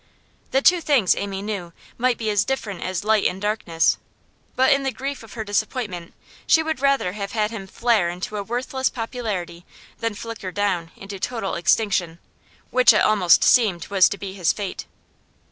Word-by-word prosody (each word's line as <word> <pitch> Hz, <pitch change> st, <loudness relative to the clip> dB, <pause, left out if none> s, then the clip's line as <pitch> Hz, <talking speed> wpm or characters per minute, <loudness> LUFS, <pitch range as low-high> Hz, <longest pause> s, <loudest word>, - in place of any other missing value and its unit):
The 270 Hz, +1 st, +1 dB
two 355 Hz, -1 st, +5 dB
things, 265 Hz, -, +3 dB
Amy 200 Hz, -1 st, -4 dB
knew, 195 Hz, -5 st, -5 dB, 0.2 s
might 250 Hz, 0 st, +1 dB
be 220 Hz, -2 st, -1 dB
as 205 Hz, -2 st, +2 dB
different 210 Hz, -8 st, -3 dB
as 185 Hz, 0 st, -3 dB
light 215 Hz, -1 st, +3 dB
and 185 Hz, -, -4 dB
darkness; 195 Hz, -6 st, +1 dB, 0.6 s
but 260 Hz, +1 st, +5 dB
in 275 Hz, -, +1 dB
the 270 Hz, -, -1 dB
grief 275 Hz, +2 st, -5 dB
of 225 Hz, -, -13 dB
her 225 Hz, -, -4 dB
disappointment 205 Hz, -4 st, -3 dB, 0.3 s
she 320 Hz, -, +5 dB
would 315 Hz, -3 st, -2 dB
rather 275 Hz, -8 st, +2 dB
have 200 Hz, 0 st, -6 dB
had 215 Hz, -1 st, 0 dB
him 195 Hz, -4 st, -7 dB
flare 220 Hz, -4 st, +1 dB
into 180 Hz, +4 st, -5 dB
a -, -, -2 dB
worthless 255 Hz, +4 st, -2 dB
popularity 210 Hz, -8 st, -5 dB, 0.4 s
than 230 Hz, -2 st, -2 dB
flicker 225 Hz, -3 st, -6 dB
down 185 Hz, -4 st, -1 dB
into 195 Hz, 0 st, -9 dB
total 225 Hz, 0 st, -3 dB
extinction, 175 Hz, -2 st, +1 dB, 0.5 s
which 255 Hz, -2 st, +6 dB
it 215 Hz, -, +3 dB
almost 195 Hz, -5 st, +4 dB
seemed 210 Hz, -10 st, +3 dB
was 195 Hz, -2 st, +5 dB
to 200 Hz, -, -4 dB
be 195 Hz, -1 st, -6 dB
his 180 Hz, -4 st, +1 dB
fate. 200 Hz, -3 st, -5 dB
210 Hz, 180 wpm, -22 LUFS, 190-240 Hz, 0.6 s, which